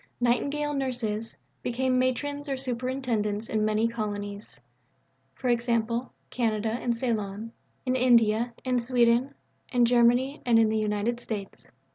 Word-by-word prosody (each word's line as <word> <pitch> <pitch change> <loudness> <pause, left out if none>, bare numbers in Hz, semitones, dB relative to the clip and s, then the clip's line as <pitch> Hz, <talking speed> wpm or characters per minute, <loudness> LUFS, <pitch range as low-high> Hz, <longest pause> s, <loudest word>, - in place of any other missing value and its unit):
"Nightingale 285 +5 +1
Nurses" 240 -5 -2 0.2
became 255 +1 0
Matrons 285 +3 -1
or 270 - -1
Superintendents 245 -4 -2
in 215 -1 0
many 215 +1 +2
Colonies 205 -2 -5 0.9
(e.g. 240 0 +1 0.6
Canada 225 -2 0
and 235 0 -1
Ceylon), 220 -2 -2 0.3
in 255 0 +1
India, 235 -2 +4
in 250 -1 +2
Sweden, 240 +2 +2 0.4
in 245 -2 +4
Germany, 245 +4 +3
and 235 -2 +4
in 225 -1 +5
the 220 - 0
United 215 +3 -1
States. 210 -5 -6
235 Hz, 120 wpm, -27 LUFS, 220-255 Hz, 0.9 s, in